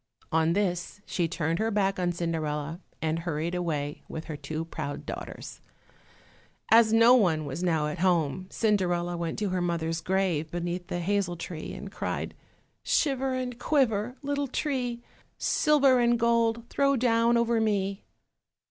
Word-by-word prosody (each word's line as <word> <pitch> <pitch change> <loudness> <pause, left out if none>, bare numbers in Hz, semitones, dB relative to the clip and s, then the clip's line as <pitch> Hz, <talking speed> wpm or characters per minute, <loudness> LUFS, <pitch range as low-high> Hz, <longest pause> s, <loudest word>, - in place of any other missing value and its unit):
On 160 +1 +3
this 185 -1 -1
she 175 -2 0
turned 165 0 -1
her 220 +1 +1
back 195 -2 +1
on 175 -1 +1
Cinderella, 160 -2 -2 0.2
and 160 +1 0
hurried 165 0 -2
away 150 -5 -2
with 160 - -6
her 155 - -5
two 155 +3 -4
proud 155 -3 -5
daughters. - - -7 1.1
As 225 -1 +7
no 230 +2 +7
one 175 -11 +3
was 160 - -5
now 165 -4 +1
at 150 0 -4
home, 175 -1 +1
Cinderella 175 -5 +1
went 170 -1 -3
to 205 -1 -1
her 185 -1 -1
mother's 165 -1 -1
grave 175 -4 0
beneath 175 +1 -3
the 175 - -3
hazel 190 -1 0
tree, 165 -1 -6
and - - -8
cried, - - -3 0.5
"Shiver 270 -3 +1
and 250 -2 -4
quiver, 245 -5 +1
little 285 0 -1
tree, 250 -4 -2 0.3
Silver 280 -5 +4
and 240 0 +3
gold 235 0 +2
throw 275 0 +3
down 235 -1 +3
over 235 -1 +2
me." 200 -2 0
185 Hz, 150 wpm, -28 LUFS, 165-235 Hz, 1.1 s, As